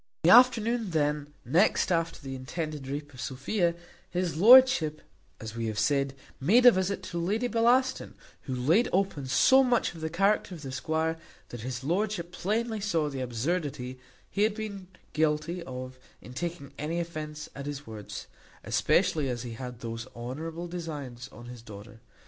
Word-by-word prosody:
In 165 Hz, -, +5 dB
the 180 Hz, -, +10 dB
afternoon 235 Hz, -3 st, +4 dB
then 150 Hz, -2 st, 0 dB
next 185 Hz, +2 st, +3 dB
after 165 Hz, -1 st, 0 dB
the 135 Hz, -3 st, -7 dB
intended 145 Hz, +2 st, -5 dB
rape 145 Hz, +1 st, -5 dB
of 125 Hz, -, -9 dB
Sophia, 170 Hz, +8 st, -1 dB, 0.3 s
his 180 Hz, -2 st, -1 dB
lordship, 215 Hz, -, +6 dB, 0.4 s
as 110 Hz, 0 st, -7 dB
we 115 Hz, -1 st, -2 dB
have 110 Hz, -1 st, -4 dB
said, 135 Hz, +4 st, +1 dB, 0.2 s
made 220 Hz, -, +4 dB
a 245 Hz, -, +11 dB
visit 190 Hz, 0 st, -1 dB
to 170 Hz, -, -4 dB
Lady 210 Hz, +8 st, 0 dB
Bellaston, 245 Hz, +3 st, +2 dB, 0.3 s
who 130 Hz, -, -2 dB
laid 160 Hz, -, +3 dB
open 185 Hz, -8 st, 0 dB
so 265 Hz, -, +5 dB
much 245 Hz, -6 st, +1 dB
of 165 Hz, -, -11 dB
the 160 Hz, -, -2 dB
character 195 Hz, +2 st, +1 dB
of 155 Hz, -, -11 dB
the 135 Hz, -, -6 dB
squire, 160 Hz, +4 st, -1 dB, 0.3 s
that 120 Hz, -, -7 dB
his 125 Hz, +1 st, -5 dB
lordship 175 Hz, +2 st, -1 dB
plainly 220 Hz, +5 st, -1 dB
saw 165 Hz, -8 st, 0 dB
the 135 Hz, -1 st, -4 dB
absurdity 130 Hz, +1 st, -3 dB, 0.3 s
he 200 Hz, -, -3 dB
had 210 Hz, 0 st, +3 dB
been 200 Hz, -4 st, -6 dB, 0.3 s
guilty 155 Hz, +3 st, 0 dB
of 130 Hz, -3 st, -7 dB, 0.2 s
in 125 Hz, -, -12 dB
taking 170 Hz, 0 st, -5 dB
any 160 Hz, +3 st, -2 dB
offence 155 Hz, -3 st, -5 dB
at 140 Hz, 0 st, -7 dB
his 145 Hz, 0 st, -5 dB
words, 110 Hz, -2 st, -8 dB, 0.4 s
especially 150 Hz, -4 st, +2 dB
as 120 Hz, -1 st, -3 dB
he 120 Hz, -2 st, -6 dB
had 125 Hz, 0 st, -8 dB
those 115 Hz, +1 st, -5 dB
honourable 160 Hz, +8 st, -5 dB
designs 150 Hz, -9 st, -6 dB
on 120 Hz, +2 st, -12 dB
his 120 Hz, -1 st, -9 dB
daughter. 105 Hz, 0 st, -11 dB
155 Hz, 170 wpm, -28 LUFS, 130-190 Hz, 0.4 s, a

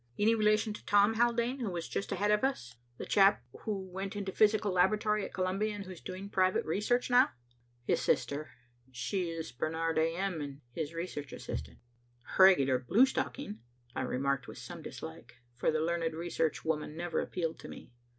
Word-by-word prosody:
Any 215 Hz, +2 st, +4 dB
relation 215 Hz, 0 st, +2 dB
to -, -, -10 dB
Tom 205 Hz, +1 st, +5 dB
Haldane 240 Hz, +3 st, +1 dB
who 235 Hz, -5 st, -2 dB
was 170 Hz, -2 st, -4 dB
just -, -, -3 dB
ahead 205 Hz, +3 st, +1 dB
of 210 Hz, +2 st, +2 dB
us, 125 Hz, -, -1 dB, 0.2 s
the -, -, -5 dB
chap 195 Hz, -, +4 dB, 0.2 s
who 195 Hz, -3 st, -2 dB
went 190 Hz, +3 st, -5 dB
into 200 Hz, -2 st, -3 dB
the -, -, -22 dB
Physical 210 Hz, -1 st, +4 dB
Laboratory 210 Hz, +3 st, +2 dB
at -, -, -5 dB
Columbia 195 Hz, +3 st, 0 dB
and 200 Hz, -1 st, -6 dB
who's 185 Hz, -2 st, -9 dB
doing 185 Hz, +2 st, -6 dB
private 185 Hz, -2 st, +2 dB
research 245 Hz, +9 st, 0 dB
now?" 250 Hz, +1 st, +6 dB, 0.6 s
"His -, -, +1 dB
sister. 145 Hz, +2 st, 0 dB, 0.4 s
She 165 Hz, +9 st, -2 dB
is 165 Hz, -1 st, -5 dB
Barnard 160 Hz, +5 st, -1 dB
A. 165 Hz, +1 st, +1 dB
M., 185 Hz, -3 st, -2 dB
and 140 Hz, 0 st, -7 dB
his 160 Hz, +4 st, -4 dB
research 155 Hz, -5 st, -5 dB
assistant." 65 Hz, -2 st, -6 dB, 0.6 s
"Regular 140 Hz, -9 st, +6 dB
bluestocking," 230 Hz, -, +1 dB, 0.4 s
I -, -, -1 dB
remarked 135 Hz, +1 st, -1 dB
with -, -, -9 dB
some -, -, -8 dB
dislike, 95 Hz, +10 st, -9 dB, 0.2 s
for 120 Hz, -, 0 dB
the 155 Hz, -, +1 dB
learned 165 Hz, -1 st, 0 dB
research 165 Hz, -2 st, -1 dB
woman 155 Hz, -1 st, -2 dB
never 175 Hz, 0 st, -1 dB
appealed 165 Hz, -3 st, -3 dB
to -, -, -9 dB
me. -, -, -11 dB
185 Hz, 180 wpm, -32 LUFS, 160-210 Hz, 0.6 s, now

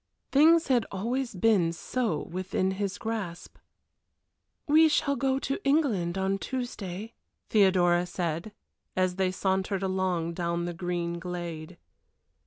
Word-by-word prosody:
Things 325 Hz, +4 st, +6 dB
had 245 Hz, -4 st, +3 dB
always 240 Hz, +4 st, -2 dB
been 185 Hz, -4 st, +3 dB
so 175 Hz, -1 st, -2 dB
within 185 Hz, +1 st, -2 dB
his 195 Hz, 0 st, -3 dB
grasp. 210 Hz, -7 st, -5 dB, 1.1 s
"We 315 Hz, +2 st, +6 dB
shall 280 Hz, -2 st, +1 dB
go 265 Hz, +1 st, +1 dB
to 275 Hz, +7 st, -3 dB
England 230 Hz, -, +1 dB
on 190 Hz, +1 st, 0 dB
Tuesday," 225 Hz, -5 st, -5 dB, 0.4 s
Theodora 180 Hz, -4 st, +4 dB
said, 175 Hz, +2 st, -3 dB, 0.4 s
as 185 Hz, 0 st, +1 dB
they 190 Hz, -1 st, +2 dB
sauntered 190 Hz, +1 st, -1 dB
along 185 Hz, -3 st, 0 dB
down 170 Hz, 0 st, -2 dB
the 175 Hz, -, -3 dB
green 170 Hz, 0 st, -3 dB
glade. 170 Hz, -1 st, -6 dB
190 Hz, 120 wpm, -28 LUFS, 175-230 Hz, 1.1 s, Things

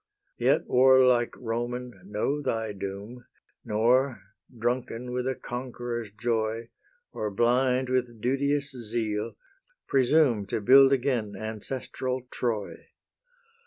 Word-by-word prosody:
Yet, -, -, +3 dB
warlike 125 Hz, -2 st, +5 dB
Roman, 120 Hz, +1 st, -3 dB
know 105 Hz, +9 st, -1 dB
thy 110 Hz, -5 st, -2 dB
doom, 100 Hz, +5 st, -7 dB, 0.4 s
Nor, 120 Hz, +4 st, +2 dB, 0.4 s
drunken 120 Hz, +1 st, -2 dB
with 125 Hz, 0 st, -1 dB
a 130 Hz, -, 0 dB
conqueror's 120 Hz, -2 st, -5 dB
joy, 115 Hz, +1 st, -2 dB, 0.4 s
Or 105 Hz, -, -3 dB
blind 125 Hz, +4 st, +2 dB
with 125 Hz, -2 st, -1 dB
duteous 140 Hz, +4 st, 0 dB
zeal, 110 Hz, -3 st, -3 dB, 0.5 s
presume 130 Hz, -5 st, +3 dB
To -, -, -1 dB
build 135 Hz, +5 st, +7 dB
again 120 Hz, -6 st, 0 dB
ancestral 125 Hz, +4 st, -4 dB
Troy. 110 Hz, -5 st, -3 dB
120 Hz, 100 wpm, -27 LUFS, 110-130 Hz, 0.5 s, build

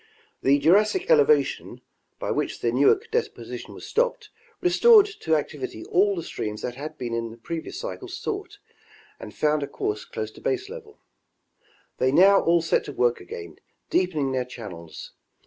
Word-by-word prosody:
The 140 Hz, +2 st, +4 dB
Jurassic 210 Hz, -, +3 dB
elevation, 455 Hz, -1 st, +3 dB, 0.4 s
by -, -, -3 dB
which -, -, -2 dB
the -, -, +1 dB
Newark 430 Hz, +2 st, +3 dB
deposition 465 Hz, -1 st, -4 dB
was -, -, -10 dB
stopped, -, -, -1 dB, 0.3 s
restored 415 Hz, +4 st, +6 dB
to 290 Hz, -, -1 dB
activity 140 Hz, -6 st, -4 dB
all 200 Hz, +3 st, +2 dB
the 170 Hz, -, -4 dB
streams 105 Hz, -6 st, -5 dB
that 125 Hz, -, -3 dB
had 150 Hz, +4 st, -7 dB
in 115 Hz, -2 st, -3 dB
the 115 Hz, -, -12 dB
previous 160 Hz, +8 st, -6 dB
cycle 485 Hz, -6 st, -6 dB
sought 395 Hz, +2 st, -5 dB, 0.6 s
and -, -, -9 dB
found 150 Hz, 0 st, +1 dB
a 140 Hz, -, -3 dB
course 415 Hz, -, -3 dB
close 465 Hz, -2 st, -5 dB
to -, -, -15 dB
baselevel. 425 Hz, +3 st, -4 dB, 1.0 s
They 130 Hz, 0 st, +3 dB
now 195 Hz, +6 st, +6 dB
all 170 Hz, 0 st, +3 dB
set 165 Hz, -, +1 dB
to -, -, -6 dB
work 120 Hz, -3 st, +1 dB
again 85 Hz, -2 st, -9 dB, 0.3 s
deepening 155 Hz, -7 st, +1 dB
their 130 Hz, -1 st, 0 dB
channels. 100 Hz, -10 st, -9 dB
170 Hz, 155 wpm, -25 LUFS, -, 1.0 s, restored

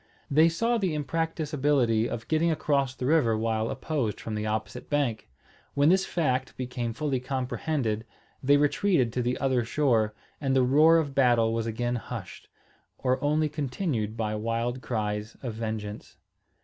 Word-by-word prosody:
They 155 Hz, +4 st, +6 dB
saw 230 Hz, +8 st, +1 dB
the 185 Hz, -6 st, 0 dB
impracticability 145 Hz, -7 st, 0 dB
of 115 Hz, -, -5 dB
getting 160 Hz, +2 st, +2 dB
across 140 Hz, -4 st, 0 dB
the 125 Hz, -, -4 dB
river 130 Hz, -7 st, +3 dB
while 110 Hz, 0 st, 0 dB
opposed 130 Hz, -6 st, -2 dB
from 110 Hz, -, -5 dB
the 105 Hz, 0 st, -2 dB
opposite 110 Hz, 0 st, -4 dB
bank. 135 Hz, -, -1 dB, 0.5 s
When 145 Hz, +2 st, +4 dB
this 190 Hz, +2 st, +3 dB
fact 130 Hz, -6 st, -1 dB
became 125 Hz, -2 st, -3 dB
fully 140 Hz, +1 st, -1 dB
comprehended, 125 Hz, -2 st, -2 dB, 0.4 s
they 140 Hz, +2 st, +5 dB
retreated 145 Hz, -, +2 dB
to 125 Hz, -, 0 dB
the 125 Hz, +1 st, -1 dB
other 130 Hz, -3 st, +1 dB
shore, 115 Hz, -4 st, +1 dB, 0.3 s
and 135 Hz, -2 st, +1 dB
the 130 Hz, -, +4 dB
roar 155 Hz, +6 st, +6 dB
of 145 Hz, -4 st, -1 dB
battle 120 Hz, -4 st, +3 dB
was 115 Hz, 0 st, -1 dB
again 120 Hz, +2 st, -1 dB
hushed, -, -, -8 dB, 0.5 s
or 130 Hz, +1 st, 0 dB
only 150 Hz, +1 st, +2 dB
continued 135 Hz, -, -2 dB
by 110 Hz, -1 st, -1 dB
wild 115 Hz, +3 st, -2 dB
cries 105 Hz, -2 st, -3 dB
of 120 Hz, -3 st, -3 dB
vengeance. 110 Hz, -2 st, -5 dB
130 Hz, 155 wpm, -27 LUFS, 115-150 Hz, 0.5 s, They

